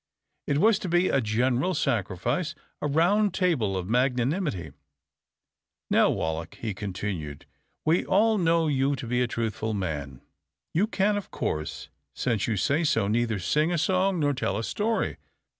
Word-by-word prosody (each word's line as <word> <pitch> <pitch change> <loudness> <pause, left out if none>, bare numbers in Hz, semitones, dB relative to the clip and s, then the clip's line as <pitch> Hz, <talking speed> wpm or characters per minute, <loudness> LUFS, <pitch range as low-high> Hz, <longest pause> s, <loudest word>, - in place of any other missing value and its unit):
It 140 - +1
was 215 +6 +4
to 185 - -4
be 175 +2 +3
a 135 - +2
general 125 +10 +1
sacrifice, 120 - -1 0.3
a - - 0
round 185 +8 +2
table 130 - +1
of 90 -1 -4
magnanimity. 125 - 0 1.2
"Now, - - +5
Wallack," 80 +1 -2
he 110 -3 -4
continued, 95 -7 -5 0.4
"we 160 +3 +3
all 215 +2 +3
know 165 -1 +3
you 140 -1 +1
to 125 - -7
be 125 +1 0
a 125 - +2
truthful 110 -1 -2
man. 75 -9 -4 0.5
You 190 +7 +2
can, 205 -1 +1
of 205 - -6
course, 75 0 -4 0.3
since 115 -4 0
you 110 -3 0
say 145 - +1
so, 115 -9 +2
neither 115 0 +1
sing 150 - +1
a 175 - +1
song 185 +3 +1
nor 145 -2 +2
tell 100 -7 -1
a 115 - -2
story. 215 - -1
130 Hz, 160 wpm, -27 LUFS, 105-175 Hz, 1.2 s, Now